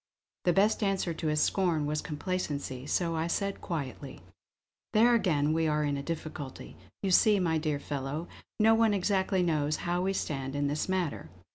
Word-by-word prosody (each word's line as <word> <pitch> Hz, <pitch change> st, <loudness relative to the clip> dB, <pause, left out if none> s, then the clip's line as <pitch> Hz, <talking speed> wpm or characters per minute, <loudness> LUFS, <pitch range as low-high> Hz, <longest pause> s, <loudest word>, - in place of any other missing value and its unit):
The 175 Hz, -, +4 dB
best 205 Hz, +6 st, +3 dB
answer 195 Hz, -4 st, 0 dB
to 160 Hz, -, -4 dB
his 150 Hz, 0 st, +1 dB
scorn 175 Hz, -6 st, +1 dB
was 150 Hz, +1 st, -1 dB
complacency; 145 Hz, -5 st, -4 dB
so 165 Hz, +1 st, 0 dB
I 160 Hz, +1 st, -1 dB
said 200 Hz, +3 st, -2 dB
quietly: 140 Hz, -4 st, -5 dB, 0.7 s
"There 235 Hz, +2 st, +5 dB
again 155 Hz, -9 st, +2 dB
we 160 Hz, 0 st, +1 dB
are 150 Hz, 0 st, +1 dB
in 145 Hz, -1 st, 0 dB
a 140 Hz, -, -3 dB
difficulty. 155 Hz, -3 st, -6 dB, 0.3 s
You 195 Hz, -, +1 dB
see, 205 Hz, +2 st, +5 dB
my 165 Hz, -3 st, +1 dB
dear 150 Hz, -2 st, -1 dB
fellow, 145 Hz, +4 st, -4 dB, 0.3 s
no 220 Hz, +1 st, +6 dB
one 225 Hz, -2 st, +3 dB
exactly 190 Hz, -1 st, +1 dB
knows 155 Hz, -3 st, +1 dB
how 175 Hz, +1 st, 0 dB
we 190 Hz, +1 st, 0 dB
stand 135 Hz, -6 st, -3 dB
in 145 Hz, 0 st, 0 dB
this 145 Hz, +5 st, -1 dB
matter. 180 Hz, -, -2 dB
165 Hz, 175 wpm, -30 LUFS, 145-190 Hz, 0.7 s, no